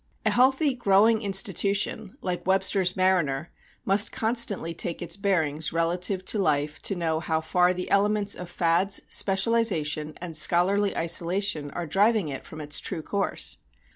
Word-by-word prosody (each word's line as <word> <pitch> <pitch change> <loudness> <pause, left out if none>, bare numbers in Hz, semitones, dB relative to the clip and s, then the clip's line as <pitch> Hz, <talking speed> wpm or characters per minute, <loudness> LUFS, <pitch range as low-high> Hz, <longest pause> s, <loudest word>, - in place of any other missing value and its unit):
A - - +3
healthy, 265 +3 +2
growing 220 -1 +3
institution 200 +1 0
like 180 -1 -3
Webster's 190 -1 +2
mariner 170 -6 0 0.3
must 200 +2 +3
constantly 220 -7 0
take 170 0 -3
its 175 -1 -4
bearings 160 -7 -1
relative 180 +3 -1
to 210 - 0
life 150 -4 -1
to 195 - +1
know 165 -2 -1
how 160 -1 -1
far 180 +3 +1
the 180 0 -4
elements 205 0 +2
of 180 -1 -5
fads, 175 +4 0
specialization, 190 -7 0
and 170 -2 -8
scholarly 190 +6 +2
isolation 170 -2 +1
are 175 +4 -5
driving 200 +2 +1
it 135 - -7
from 155 - -9
its 145 0 -2
true 170 -5 -4
course. 200 +4 -2
185 Hz, 145 wpm, -25 LUFS, 165-200 Hz, 0.3 s, A